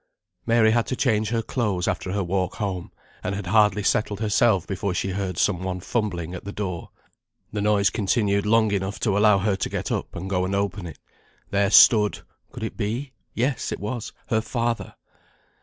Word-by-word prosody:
Mary 115 -1 +4
had 115 0 +1
to 130 - -2
change 110 -4 +1
her 115 -1 0
clothes 105 -9 -1
after 95 - -2
her 100 0 -1
walk 90 0 -1
home; 95 -5 -4 0.3
and 95 +2 -2
had 100 -1 -5
hardly 105 +1 +3
settled 105 0 +1
herself 110 -3 +2
before 95 -1 -3
she 95 - -1
heard 95 -2 -3
some 95 0 +1
one 95 -1 -3
fumbling 90 -5 -2
at 90 - -7
the 100 - -6
door. 95 -5 -4 0.6
The 105 - -1
noise 100 -1 +3
continued 100 0 +1
long 110 -1 +4
enough 95 0 -2
to 105 -4 +1
allow 105 0 +5
her 100 +1 +1
to - - -2
get - - -3
up, - - -3
and 90 +3 -5
go 90 -1 0
and 95 +2 -1
open 100 -2 -2
it. 80 -4 -10 0.5
There 100 0 +2
stood 105 -1 +6 0.3
could 125 -4 -8
it 110 - -4
be? 120 +6 -3 0.2
yes 125 +3 -1
it - - -3
was, 110 +3 -4 0.2
her 110 -3 +2
father! 115 0 -2
100 Hz, 190 wpm, -24 LUFS, 95-110 Hz, 0.6 s, stood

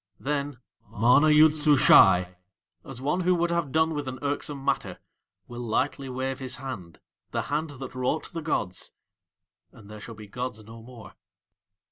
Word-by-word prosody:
Then 145 -1 -3 0.3
MANA 120 +7 +4
YOOD 155 0 +6
SUSHAI, 95 - +5 0.5
as 135 -2 -9
one 145 +7 -1
who 180 0 +2
would 170 0 0
have 170 -5 -1
done 160 +2 +2
with 145 -2 -4
an 130 0 -5
irksome 145 -1 -3
matter, - - -1 0.5
will 120 0 -9
lightly 130 +4 -2
wave 130 +1 -3
his 130 -1 -2
hand 120 - -8 0.3
the - - -2
hand 155 +2 -1
that 135 -2 -9
wrought 130 +5 -2
the 165 - -4
gods 100 - -3 0.8
and 105 -1 -15
there 105 0 -10
shall 115 +1 -9
be 105 0 -11
gods 125 0 -6
no 115 +2 -12
more. 115 -1 -13
130 Hz, 160 wpm, -26 LUFS, 115-150 Hz, 0.8 s, YOOD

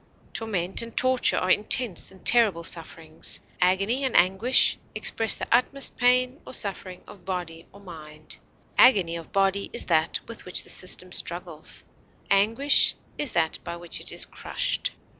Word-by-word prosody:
Torment 195 -5 -1
and 230 0 -9
torture 255 -1 +2
are 185 - 0
intense 210 -1 +3
and 190 - -18
terrible 215 -8 +4
sufferings. 165 -1 -4 0.2
Agony 195 +9 +1
and 260 -3 +1
anguish 190 +8 +3 0.2
express 225 -1 +2
the - - -5
utmost 270 +2 0
pain 250 +3 +1
or - - -3
suffering 190 -2 -3
of 200 - -14
body 175 -3 -6
or 200 - -16
mind. 155 -5 -12 0.4
Agony 190 -10 +5
of 165 -1 -9
body 195 0 0
is - - -4
that 160 +1 0
with 230 - -9
which 180 - -1
the - - -9
system 185 0 +1
struggles; 170 -3 -4 0.5
anguish 225 +9 +3 0.2
that 230 - -1
by 170 - -6
which 170 0 -6
it - - -5
is - - +1
crushed. - - -2
195 Hz, 150 wpm, -25 LUFS, 170-235 Hz, 0.5 s, Agony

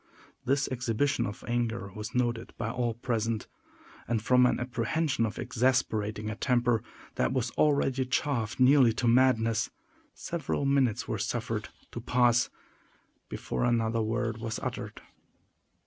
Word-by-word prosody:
This 135 +2 +1
exhibition 125 +2 0
of 100 - -8
anger 120 -4 -2
was 110 +3 -7
noted 120 -2 -1
by 115 0 -2
all 120 -2 -1
present; 115 -2 -2 0.6
and 115 -1 +1
from 125 +3 +4
an - - 0
apprehension 120 +2 0
of 110 - -7
exasperating 115 -4 0
a 110 - -3
temper 120 -2 +1 0.4
that - - +1
was 125 -2 -1
already 140 -3 +2
chafed 125 -4 -1
nearly 130 -2 +6
to 120 +2 -1
madness, 115 -3 +3 0.5
several 155 -4 -3
minutes 135 -5 +2
were - - -2
suffered - - -3 0.2
to - - -6
pass 120 -1 +3 0.8
before - - -3
another 115 -1 +1
word 115 0 -1
was 110 -1 -3
uttered. - - -5
120 Hz, 130 wpm, -29 LUFS, 115-130 Hz, 0.8 s, nearly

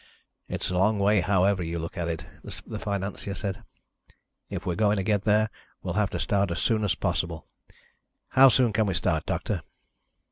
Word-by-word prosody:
"It's - - -2
a 90 - 0
long 105 +3 +3
way 100 0 +3
however 95 +1 +2
you 85 0 -3
look 85 0 -5
at 85 -1 -2
it," 80 -2 -4 0.2
the - - -8
financier 100 0 -3
said. 100 -3 -4 0.9
"If - - -5
we're 90 - 0
going 105 +4 +2
to 95 - 0
get 105 -1 0
there, 110 0 +3 0.3
we'll 90 - -2
have 105 0 +1
to - - -4
start 100 -1 +1
as 85 - -2
soon 110 +5 +1
as 100 - +1
possible. 85 -2 -2 0.8
How 135 +1 +7
soon 125 -3 +3
can 110 0 +2
we 95 - 0
start, 80 -3 0
Doctor?" - - -2
100 Hz, 185 wpm, -27 LUFS, 90-105 Hz, 0.9 s, How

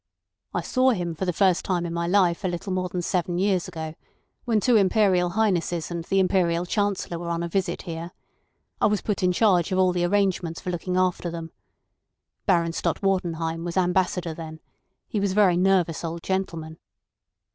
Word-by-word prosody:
"I - - -1
saw 255 0 +2
him 175 -8 -1
for 175 +4 -3
the 180 - +1
first 185 0 +2
time 175 -2 -1
in 170 - -4
my 170 0 -1
life 180 -1 +2
a - - +1
little 180 +2 -3
more 185 -1 -1
than 175 0 -3
seven 175 -1 -1
years 190 -1 +1
ago, 160 -3 -6 0.5
when 230 -3 +2
two 245 +3 +3
Imperial 190 -3 +3
Highnesses 175 -6 0
and 170 -1 -3
the 195 - 0
Imperial 180 -2 +2
Chancellor 200 -3 -1
were 170 0 -5
on 170 0 -1
a - - -2
visit 190 +2 -2
here. 165 -1 -6 0.7
I - - +5
was 210 -1 0
put 210 -3 -1
in 180 -1 +3
charge 180 -2 +3
of 185 - +1
all 185 -1 +4
the 175 -1 0
arrangements 185 -3 0
for 180 - -4
looking 180 +1 -2
after 185 -1 +1
them. 165 -1 -6 1.0
Baron 170 -3 +2
Stott - - -2
Wartenheim 165 -4 -1
was 175 +1 -4
Ambassador 180 -2 +1
then. 160 0 -8 0.5
He 210 - -2
was 200 -1 0
a - - -5
very 200 -4 +5
nervous 180 -3 +2
old 165 0 -5
gentleman. 165 -4 -3
180 Hz, 190 wpm, -25 LUFS, 170-190 Hz, 1.0 s, I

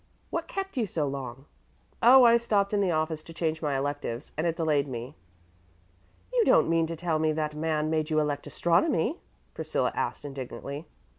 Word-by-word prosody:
What 335 0 -2
kept 390 -5 -5
you 230 -4 +1
so 160 -4 -1
long?" 135 -1 -6 0.6
"Oh, 255 +2 +8
I 235 -1 +7
stopped 205 -3 +1
in 205 - +2
the 195 -2 +2
office 155 -1 -1
to 165 +1 -12
change 160 -2 -1
my 145 -3 0
electives, 140 -2 -3
and 155 +3 0
it 165 - 0
delayed 150 -4 +1
me." 120 -1 -6 1.2
"You - - +4
don't - - +5
mean 165 -1 +2
to 165 - -4
tell 165 -1 -1
me 155 0 +2
that 155 -1 -2
man 155 0 -1
made 155 -1 0
you 155 -1 +2
elect 145 -1 -1
astronomy?" 175 - +1 0.3
Priscilla - - -1
asked - - -3
indignantly. 140 +2 -6
155 Hz, 180 wpm, -28 LUFS, 145-175 Hz, 1.2 s, Oh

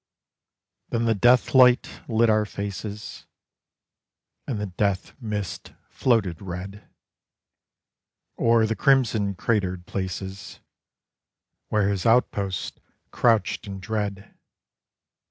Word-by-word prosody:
Then 115 0 0
the 115 - +3
death 120 +4 +3
light 125 -1 +4
lit 115 0 +3
our 110 -1 +3
faces, 100 +1 -6 1.2
And 120 -6 -2
the 105 - -2
death 95 0 -2
mist 105 -4 -5 0.2
floated 105 -10 0
red 95 +2 -8 1.5
O'er 115 -1 +4
the 110 +1 -1
crimson 115 -8 +2
cratered 95 -6 -1
places 95 +1 -5 1.1
Where 105 -2 +1
his 100 0 -1
outposts 100 -5 0 0.3
crouched 115 -2 +1
in 100 -1 -6
dread.... 100 -1 -4
105 Hz, 95 wpm, -24 LUFS, 95-115 Hz, 1.5 s, light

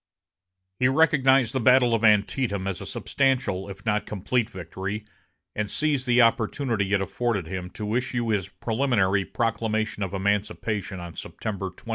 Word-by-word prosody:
He 125 - +4
recognized 135 -4 +4
the 130 - 0
battle 125 0 +5
of 115 0 +1
Antietam 105 -1 +2
as 95 -2 -3
a - - -7
substantial, 130 -9 0
if 100 +4 -10
not 105 -1 +2
a - - -25
complete 110 +3 -1
victory, 95 +3 -5 0.5
and 105 -1 -2
seized 145 +1 0
the 125 0 +5
opportunity 115 -2 +1
it 100 -2 +3
afforded 100 0 -1
him 90 +1 -5
to 105 0 -3
issue 120 -1 -1
his 100 -3 0
preliminary 105 -5 +1
proclamation 110 -2 -1
of 95 0 -2
emancipation 100 0 -1
on 85 -1 -8
September 95 +3 -5
22. 95 +5 -15
110 Hz, 155 wpm, -25 LUFS, 95-125 Hz, 0.5 s, battle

